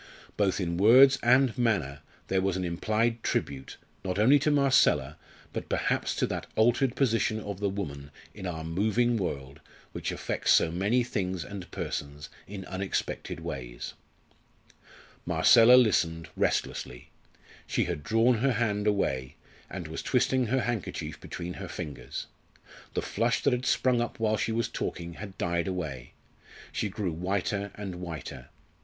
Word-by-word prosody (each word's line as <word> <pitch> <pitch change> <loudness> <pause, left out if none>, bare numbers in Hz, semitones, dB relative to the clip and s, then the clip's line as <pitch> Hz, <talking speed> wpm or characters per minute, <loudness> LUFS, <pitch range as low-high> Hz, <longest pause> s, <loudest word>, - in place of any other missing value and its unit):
Both 100 -2 +1
in 85 -2 -1
words 130 +7 +7
and 125 0 +4
manner 80 - +1 0.3
there 95 0 +1
was 95 -1 0
an 95 - -2
implied 110 +7 0
tribute, 70 -9 -3 0.3
not 95 -1 -2
only 130 +8 +6
to 150 - +1
Marcella, 130 - +3 0.4
but - - -5
perhaps - - 0
to - - +1
that - - -4
altered 120 +3 +3
position 115 -4 +1
of 100 -3 -6
the 100 -1 0
woman 70 -8 -5 0.2
in 95 - -6
our 80 -2 -4
moving 110 +8 +1
world 70 -8 -4 0.3
which - - -3
affects - - -1
so 80 - +4
many 105 +8 +1
things 95 -7 -2
and 100 -3 -8
persons 70 0 -5 0.2
in 95 -1 -7
unexpected 95 +1 -3
ways. - - -6 1.3
Marcella 115 +2 +6
listened, 85 -9 +3
restlessly. 60 0 -2 0.6
She - - +1
had 85 -4 -3
drawn 115 +5 +3
her 135 +2 +2
hand 105 -2 0
away, 70 -10 0 0.3
and 90 -4 -6
was 80 - -5
twisting 130 0 +1
her 130 +3 +1
handkerchief 115 -8 -3
between 90 0 -6
her 100 - -5
fingers. 75 -7 -6 0.7
The - - 0
flush 115 0 0
that 140 - +3
had 125 +1 -1
sprung 125 -2 +2
up 120 - -4
while 110 -1 +2
she 115 - -1
was 115 +1 0
talking 85 0 -4
had 100 -3 -8
died 85 0 -1
away. 75 -10 -4 0.6
She 105 - -2
grew 95 -2 -3
whiter 100 +4 -2
and 95 -4 -6
whiter. 80 -8 -7
100 Hz, 150 wpm, -28 LUFS, 85-115 Hz, 1.3 s, words